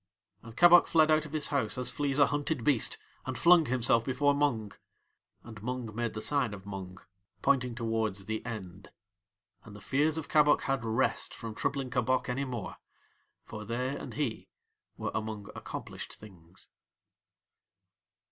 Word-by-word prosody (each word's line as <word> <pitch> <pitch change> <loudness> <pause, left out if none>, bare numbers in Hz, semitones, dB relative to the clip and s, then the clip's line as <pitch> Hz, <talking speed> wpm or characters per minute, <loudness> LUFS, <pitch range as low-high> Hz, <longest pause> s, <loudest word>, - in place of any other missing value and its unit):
And 115 +1 -13
Kabok 175 0 +8
fled 155 -1 +4
out 155 0 +3
of - - -14
his 155 -2 0
house 125 -7 -1
as 125 - +1
flees 145 -2 -1
a 145 - +7
hunted 145 -2 -2
beast 130 -3 +2 0.3
and - - -3
flung 170 -3 +6
himself 120 -2 +2
before 140 +3 +2
Mung. 130 -8 0 0.7
And 110 -2 -11
Mung 125 -1 -4
made 120 0 -3
the 110 - -4
sign 130 -5 0
of 95 0 -13
Mung, 95 -2 -7 0.5
pointing 125 -3 +2
towards 110 -4 -1
THE 110 +1 -3
END. 100 -5 -7 0.7
And 105 - -12
the - - -10
fears 145 +9 +1
of 160 - -4
Kabok 150 -1 +4
had 135 -3 -1
rest 115 +3 0
from 115 -2 -7
troubling 135 +3 -2
Kabok 130 0 +1
any 135 +3 -1
more, 120 -6 -5 0.7
for 110 0 -7
they 125 +5 -2
and - - -7
he 140 -7 -3 0.5
were - - -3
among 110 -2 -4
accomplished - - -7
things. 95 -4 -15
125 Hz, 155 wpm, -30 LUFS, 110-140 Hz, 0.7 s, Kabok